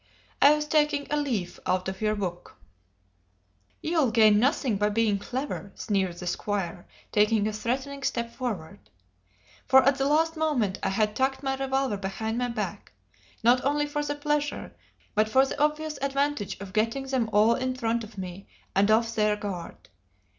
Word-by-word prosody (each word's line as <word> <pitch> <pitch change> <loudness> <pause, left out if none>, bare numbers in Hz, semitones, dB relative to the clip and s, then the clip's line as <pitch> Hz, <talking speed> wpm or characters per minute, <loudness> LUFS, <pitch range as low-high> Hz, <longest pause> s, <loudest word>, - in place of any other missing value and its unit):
"I 290 +2 +8
was 300 0 -2
taking 300 -2 +2
a - - +2
leaf 245 -12 -2
out 185 0 0
of 190 +1 -5
your 215 0 +1
book." 180 -4 -5 1.3
"You'll 315 -6 +2
gain 215 -2 +5
nothing 255 -3 +1
by 210 +1 +2
being 210 -1 +1
clever!" 250 -4 -4
sneered 190 -5 -1
the 180 - -7
squire, 180 -1 -3 0.2
taking 210 0 +3
a 215 - -2
threatening 265 +6 -3
step 235 -3 -2
forward. 205 -8 -5 0.8
For 265 0 +7
at 275 +1 +3
the 270 - +2
last 320 +3 +2
moment 275 -12 0
I 195 - 0
had 210 +2 0
tucked 265 +1 0
my 270 -1 0
revolver 270 -4 -1
behind 220 +4 -3
my 245 0 0
back, 235 - -5 0.5
not 245 +2 +4
only 295 +2 +1
for 295 0 -2
the 290 0 -2
pleasure, 295 0 -2 0.4
but 215 +1 +2
for 265 +4 +5
the 270 - -4
obvious 300 0 -1
advantage 275 -7 -1
of 195 -1 -9
getting 230 +6 0
them 260 -4 0
all 215 +3 +5
in 255 +1 -2
front 230 -2 -1
of 215 -1 -12
me 185 +1 -7 0.3
and 200 +2 +4
off 225 +1 +3
their 210 -1 +2
guard. 200 -5 -7
230 Hz, 170 wpm, -27 LUFS, 205-275 Hz, 1.3 s, I